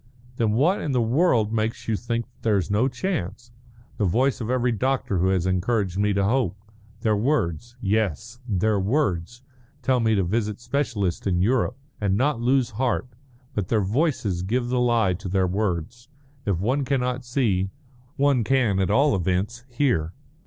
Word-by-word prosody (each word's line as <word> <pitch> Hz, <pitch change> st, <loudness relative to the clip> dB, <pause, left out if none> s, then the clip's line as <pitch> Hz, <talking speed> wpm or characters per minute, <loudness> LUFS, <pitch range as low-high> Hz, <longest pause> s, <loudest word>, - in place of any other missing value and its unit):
"Then 110 Hz, -2 st, +1 dB
what 160 Hz, -, +2 dB
in 145 Hz, -, -2 dB
the 125 Hz, -, +2 dB
world 120 Hz, -2 st, +2 dB
makes 110 Hz, 0 st, -2 dB
you 110 Hz, -, +1 dB
think 115 Hz, +1 st, -2 dB
that -, -, -33 dB
there's 100 Hz, -5 st, +1 dB
no 110 Hz, +6 st, +3 dB
chance?" 120 Hz, -, -4 dB, 0.5 s
"The 105 Hz, -, +1 dB
voice 130 Hz, +8 st, +1 dB
of 115 Hz, -, -3 dB
every 125 Hz, -1 st, +1 dB
doctor 125 Hz, -4 st, 0 dB
who 90 Hz, -, +2 dB
has 95 Hz, -2 st, +1 dB
encouraged 95 Hz, +1 st, 0 dB
me 105 Hz, 0 st, +2 dB
to 100 Hz, 0 st, +1 dB
hope. 105 Hz, -3 st, +1 dB, 0.4 s
Their 110 Hz, -1 st, +2 dB
words 120 Hz, -, -1 dB
yes 110 Hz, -, -1 dB
their 105 Hz, +1 st, +1 dB
words 110 Hz, -, -1 dB, 0.4 s
tell 130 Hz, -1 st, +2 dB
me 110 Hz, -2 st, +2 dB
to 100 Hz, -, +2 dB
visit 105 Hz, +2 st, -1 dB
specialists 120 Hz, -, -1 dB
in 90 Hz, -1 st, +2 dB
Europe, 125 Hz, +3 st, +1 dB, 0.2 s
and 100 Hz, -1 st, +1 dB
not 130 Hz, -1 st, +1 dB
lose 130 Hz, 0 st, +2 dB
heart, 125 Hz, +3 st, -1 dB, 0.4 s
but 100 Hz, -4 st, -2 dB
their 110 Hz, -1 st, +1 dB
voices 110 Hz, -, 0 dB
give 120 Hz, +6 st, -1 dB
the 125 Hz, 0 st, +1 dB
lie 115 Hz, -6 st, +3 dB
to 95 Hz, +2 st, -6 dB
their 95 Hz, 0 st, +2 dB
words. 100 Hz, -, -2 dB, 0.4 s
If 95 Hz, -4 st, +1 dB
one 130 Hz, +9 st, 0 dB
cannot 125 Hz, -1 st, -1 dB
see, 115 Hz, -7 st, 0 dB, 0.5 s
one 140 Hz, -3 st, +3 dB
can 115 Hz, -5 st, +2 dB
at 95 Hz, -, +1 dB
all 135 Hz, +3 st, +4 dB
events 95 Hz, +7 st, -1 dB
hear." 120 Hz, -, 0 dB
115 Hz, 170 wpm, -24 LUFS, 95-125 Hz, 0.5 s, all